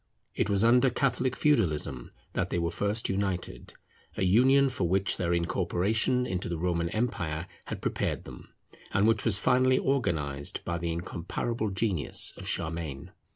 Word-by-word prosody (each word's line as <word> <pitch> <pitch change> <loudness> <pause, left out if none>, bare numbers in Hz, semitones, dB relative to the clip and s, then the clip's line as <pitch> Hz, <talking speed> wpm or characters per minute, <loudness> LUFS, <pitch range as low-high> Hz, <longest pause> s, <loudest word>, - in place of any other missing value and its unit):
It - - -1
was 100 0 +2
under 125 +3 +5
Catholic 130 0 0
Feudalism 80 - +1 0.2
that - - -1
they - - -1
were 85 0 0
first 105 +5 0
united; 95 -2 -3 0.4
a - - 0
union 130 +9 +5
for 120 -9 -1
which 95 +1 +2
their 85 -1 -1
incorporation 95 +8 +1
into 90 -5 -3
the 85 - -2
Roman 85 0 -1
empire 85 -8 -2 0.2
had - - -6
prepared - - -1
them, - - -11 0.5
and 100 +2 +4
which 115 - +2
was 110 -4 +5
finally 130 +3 +3
organized 75 - -1
by 85 0 -2
the 85 0 -2
incomparable 90 +6 -3
genius 95 -6 0
of - - -8
Charlemagne. 80 -4 -3
95 Hz, 155 wpm, -28 LUFS, 85-120 Hz, 0.5 s, under